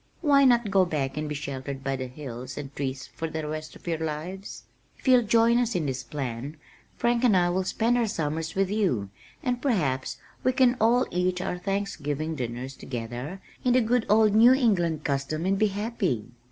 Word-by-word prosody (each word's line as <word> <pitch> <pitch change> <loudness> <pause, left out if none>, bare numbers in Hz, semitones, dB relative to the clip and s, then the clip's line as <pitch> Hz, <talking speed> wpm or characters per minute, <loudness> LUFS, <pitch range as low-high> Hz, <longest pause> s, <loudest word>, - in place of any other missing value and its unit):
Why 280 -3 +5
not 235 -5 +4
go 190 -1 +5
back 145 -6 -2
and 150 0 -3
be 150 - -3
sheltered 140 -1 -5
by 135 0 -1
the 130 -1 -4
hills 125 -2 -8
and 140 -1 -7
trees 130 -1 -3
for 165 - -4
the 160 -1 -4
rest 155 0 -5
of - - -16
your 165 -2 -1
lives? 160 +5 -5 0.3
If - - -11
you'll 255 -1 +7
join 230 +1 +4
us 240 -2 0
in 170 -4 0
this 130 -2 -2
plan, 130 +2 -5 0.4
Frank 240 0 +1
and 220 -6 +5
I 175 -1 +3
will 185 +1 0
spend 230 +6 +1
our 230 - +1
summers 160 -4 -2
with 195 0 +1
you 130 - 0 0.3
and 250 -3 -1
perhaps 150 - 0 0.3
we 255 - +3
can 255 -1 +4
all 240 +3 +4
eat 180 +1 0
our 180 -1 -3
Thanksgiving 160 -6 -2
dinners 130 -1 -5
together 125 +10 -6 0.2
in 250 - +3
the 255 - +5
good 235 +1 +1
old 215 0 +5
New 230 +4 +7
England 175 - +1
custom 140 +4 -1
and 195 +1 +1
be 215 - +4
happy." 200 - -2
175 Hz, 195 wpm, -27 LUFS, 140-220 Hz, 0.4 s, you'll